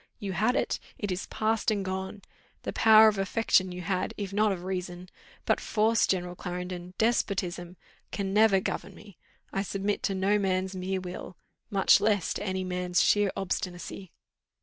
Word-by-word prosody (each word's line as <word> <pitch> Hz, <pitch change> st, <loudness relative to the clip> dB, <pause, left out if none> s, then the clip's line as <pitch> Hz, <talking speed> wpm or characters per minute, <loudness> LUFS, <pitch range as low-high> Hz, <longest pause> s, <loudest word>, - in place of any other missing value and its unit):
You 195 Hz, -2 st, -4 dB
had 220 Hz, +7 st, +1 dB
it. -, -, 0 dB, 0.2 s
It 205 Hz, -2 st, -3 dB
is 180 Hz, +1 st, -3 dB
past 220 Hz, +1 st, 0 dB
and 205 Hz, -3 st, -1 dB
gone. 190 Hz, +1 st, -4 dB, 0.4 s
The -, -, -4 dB
power 220 Hz, 0 st, +7 dB
of 210 Hz, -2 st, +2 dB
affection 195 Hz, -1 st, +2 dB
you 180 Hz, 0 st, -6 dB
had, 185 Hz, +1 st, -2 dB
if 200 Hz, -2 st, -5 dB
not 210 Hz, +1 st, +3 dB
of 180 Hz, -2 st, -4 dB
reason; 180 Hz, -1 st, -5 dB, 0.4 s
but -, -, +2 dB
force, 225 Hz, +1 st, +2 dB
General 180 Hz, -1 st, -1 dB
Clarendon, 180 Hz, 0 st, -6 dB
despotism, 185 Hz, -6 st, -1 dB, 0.3 s
can 195 Hz, -1 st, -3 dB
never 210 Hz, -2 st, +5 dB
govern 190 Hz, 0 st, -4 dB
me. 205 Hz, -5 st, -15 dB, 0.3 s
I 195 Hz, -, 0 dB
submit 200 Hz, +1 st, -2 dB
to 195 Hz, -, 0 dB
no 195 Hz, +2 st, +2 dB
man's 190 Hz, -1 st, -1 dB
mere 185 Hz, +1 st, -2 dB
will, 180 Hz, 0 st, -8 dB, 0.3 s
much 195 Hz, 0 st, +4 dB
less 205 Hz, -4 st, +1 dB
to -, -, -5 dB
any 190 Hz, -2 st, -2 dB
man's 180 Hz, -1 st, 0 dB
sheer 205 Hz, -2 st, +3 dB
obstinacy." 185 Hz, -1 st, -4 dB
190 Hz, 170 wpm, -28 LUFS, 180-205 Hz, 0.4 s, power